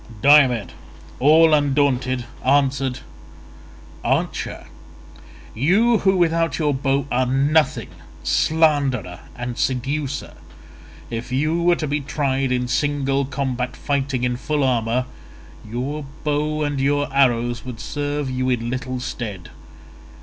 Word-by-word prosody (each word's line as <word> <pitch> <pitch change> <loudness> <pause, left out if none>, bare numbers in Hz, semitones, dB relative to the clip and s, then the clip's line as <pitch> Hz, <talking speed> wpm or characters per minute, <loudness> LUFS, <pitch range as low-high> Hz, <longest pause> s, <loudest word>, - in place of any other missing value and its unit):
Diomed 130 - +5 0.5
all 155 +4 +6
undaunted 135 -4 +1 0.2
answered, 135 -1 +1 1.0
"Archer, - - -2 0.9
you 205 - +3
who 190 -1 +2
without 165 -4 +1
your 150 -3 +1
bow 135 0 0
are 125 +1 +1
nothing, 145 +4 +1 0.3
slanderer 145 - +1 0.2
and 120 -1 -5
seducer, 135 +3 -2 0.8
if 115 +1 -5
you 155 +6 0
were 175 0 +4
to 155 - -3
be 145 0 -1
tried 135 -2 -1
in 125 0 0
single 140 0 0
combat 130 -2 -3
fighting 135 -3 -1
in 125 0 0
full 150 +2 -1
armour, 125 -1 +1 0.6
your 130 +7 -4 0.2
bow 150 +1 0
and 145 -2 -1
your 145 +1 +1
arrows 120 -4 +2
would 125 -3 -8
serve 145 +1 -3
you 130 0 -1
in 120 -1 -1
little 130 0 -3
stead. 110 -7 -6
135 Hz, 115 wpm, -21 LUFS, 125-145 Hz, 1.0 s, all